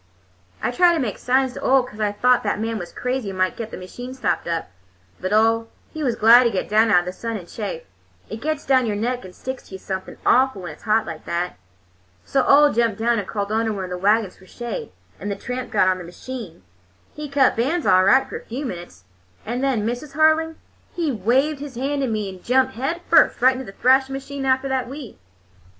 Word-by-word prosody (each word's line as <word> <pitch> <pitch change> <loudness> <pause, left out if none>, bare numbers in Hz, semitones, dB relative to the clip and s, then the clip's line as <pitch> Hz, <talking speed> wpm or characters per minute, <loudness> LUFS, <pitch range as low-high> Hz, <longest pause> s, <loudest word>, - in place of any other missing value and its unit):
"I - - +1
tried 345 +6 +4
to - - 0
make 230 -8 -3
signs 260 0 +1
to - - -8
Ole, 265 -1 +4
'cause 215 -4 -11
I 210 -1 +1
thought 250 +4 +3
that 205 -1 -1
man 225 0 -2
was 175 -1 -7
crazy 250 -4 -3
and 190 - -6
might 185 0 +1
get 230 -2 -6
the - - -8
machine 245 +8 -8
stopped 190 -11 -1
up. 165 - -3 0.5
But 185 - -3
Ole, 225 +1 +3 0.2
he 315 - -5
was 245 -4 +1
glad 235 +3 +7
to - - +4
get 195 - -2
down 220 +2 +3
out 180 -4 +5
of - - -10
the 180 - -4
sun 230 +2 -4
and 175 -4 -10
chaff—it 95 - -8
gets 310 0 -2
down 260 -3 +3
your 210 - -1
neck 245 +4 -2
and 185 -1 -11
sticks 260 0 -7
to 190 - -9
you - - -5
something 190 0 -6
awful 255 -6 +3
when 175 - -5
it's 150 - -15
hot 220 0 +2
like 165 -4 -8
that. 170 - -3 0.7
So 270 - +2
Ole 290 +1 +6
jumped 230 -3 +1
down 230 0 +1
and 200 - -5
crawled 205 -1 -3
under 225 0 +1
one 200 -3 -4
of 180 - -6
the 180 - -3
wagons 205 0 +2
for 190 - -19
shade, 240 - -6 0.3
and 205 - -4
the 200 - -2
tramp 250 +4 -5
got 200 -5 +3
on 185 0 +2
the - - -7
machine. 180 - -9 0.5
He 300 -1 -7
cut 275 -1 +3
bands 290 +9 0
all 185 0 +5
right 265 +8 +4
for - - -6
a - - -19
few 265 +6 -5
minutes, 175 - -8 0.4
and 245 +4 -3
then, 250 -6 +1
Mrs. 245 +5 -4
Harling, 315 +1 +3 0.4
he 330 -4 0
waved 260 +7 +1
his 285 -3 -8
hand 280 +3 -1
to 270 - 0
me 215 -3 -2
and 185 -2 -9
jumped 260 +1 +2
head 275 +9 -3
first 325 - +5
right 255 +2 +5
into 260 0 -6
the 195 - -12
thrashing 265 +1 +3
machine 270 0 -5
after 260 +1 +2
the 265 -1 +1
wheat. 255 -1 -8
235 Hz, 235 wpm, -22 LUFS, 200-265 Hz, 0.7 s, glad